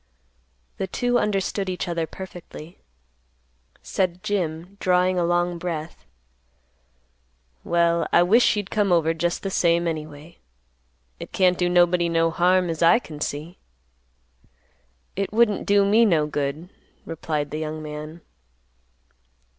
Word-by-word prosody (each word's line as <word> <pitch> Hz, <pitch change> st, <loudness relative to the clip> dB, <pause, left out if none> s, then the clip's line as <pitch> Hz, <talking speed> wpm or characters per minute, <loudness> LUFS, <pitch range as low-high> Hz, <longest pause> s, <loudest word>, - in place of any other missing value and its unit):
The 190 Hz, -, -3 dB
two 245 Hz, +5 st, 0 dB
understood 195 Hz, -2 st, -1 dB
each 180 Hz, -1 st, -3 dB
other 170 Hz, -2 st, -2 dB
perfectly. 175 Hz, -3 st, -10 dB, 1.0 s
Said 185 Hz, -1 st, -2 dB
Jim, 180 Hz, -1 st, -3 dB
drawing 180 Hz, 0 st, +2 dB
a -, -, +1 dB
long 175 Hz, 0 st, 0 dB
breath, 165 Hz, -2 st, -6 dB, 1.6 s
"Well 170 Hz, 0 st, +1 dB
I 175 Hz, -, +5 dB
wish 225 Hz, +6 st, +4 dB
you'd 205 Hz, -1 st, -4 dB
come 205 Hz, -3 st, +1 dB
over 165 Hz, -2 st, +3 dB
just 170 Hz, +1 st, -2 dB
the 195 Hz, -, -3 dB
same, 170 Hz, -1 st, +2 dB
anyway. 155 Hz, 0 st, -7 dB, 0.8 s
It -, -, -9 dB
can't 185 Hz, -1 st, +3 dB
do 180 Hz, 0 st, 0 dB
nobody 175 Hz, -1 st, +3 dB
no 165 Hz, 0 st, +2 dB
harm 180 Hz, +2 st, +2 dB
as 165 Hz, -1 st, -4 dB
I 170 Hz, +7 st, +6 dB
can 155 Hz, -11 st, -9 dB
see." 155 Hz, +6 st, -5 dB, 1.6 s
"It 195 Hz, 0 st, -2 dB
wouldn't 215 Hz, -2 st, +2 dB
do 200 Hz, 0 st, +4 dB
me 215 Hz, +4 st, +4 dB
no 165 Hz, -9 st, +3 dB
good," 150 Hz, +3 st, -3 dB, 0.4 s
replied 150 Hz, -2 st, -3 dB
the 155 Hz, -, -4 dB
young 155 Hz, 0 st, -5 dB
man. 155 Hz, +2 st, -8 dB
175 Hz, 130 wpm, -23 LUFS, 160-185 Hz, 1.6 s, I